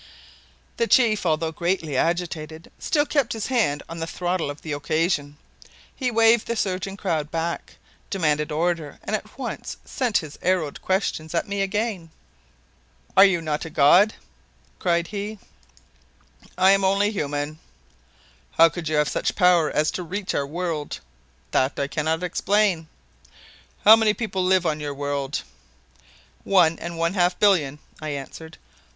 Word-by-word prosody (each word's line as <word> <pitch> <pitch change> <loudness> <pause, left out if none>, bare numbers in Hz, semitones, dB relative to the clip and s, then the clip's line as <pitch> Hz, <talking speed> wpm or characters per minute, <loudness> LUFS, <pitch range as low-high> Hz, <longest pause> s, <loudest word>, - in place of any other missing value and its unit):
The 230 - +1
chief, 220 -7 +3
although 160 0 0
greatly 170 -3 -2
agitated, 160 0 -2
still 295 -2 +1
kept 285 -5 0
his 220 -2 -4
hand 215 - 0
on 165 0 -7
the 165 - -3
throttle 175 -2 -2
of 145 +1 -8
the 160 - -5
occasion. 150 0 -1 0.6
He 255 -2 -1
waved 230 -1 +4
the 235 - -1
surging 195 -1 -2
crowd 160 -7 -2
back, 165 +1 -4 0.3
demanded 150 -6 0
order 165 -1 -1
and - - -1
at - - -8
once - - -5
sent 245 -5 0
his 155 -3 -6
arrowed 175 -5 0
questions 175 -4 -1
at 170 - 0
me 200 0 -2
again. 195 -3 -2 1.1
"Are 195 - +9
you 185 -4 +2
not 150 -1 -2
a 165 - -6
god?" 175 +9 +5 0.6
cried 170 -1 +1
he. 210 +2 -5 1.2
"I 190 +1 +6
am 195 0 +3
only 200 +2 +2
human." 145 -4 -3 0.9
"How 165 0 +6
could 165 -2 -5
you 155 - 0
have 150 0 +3
such - - -1
power 180 -4 +4
as 155 +1 +1
to - - -4
reach 185 +3 -4
our 140 - -1
world?" 160 -2 -4 0.5
"That 130 +2 +1
I 140 - +1
cannot 160 +4 -1
explain." 185 -2 +1 1.0
"How 215 +2 +11
many 220 -2 +2
people 200 -5 -2
live 185 -1 +3
on 155 -2 0
your 145 -1 -4
world?" 145 0 -3 1.0
"One 170 -4 +3
and 170 0 -6
one 165 +2 0
half 180 -2 +2
billion," 165 -9 +3 0.2
I 155 - -4
answered. 150 +3 -7
170 Hz, 150 wpm, -24 LUFS, 155-195 Hz, 1.2 s, How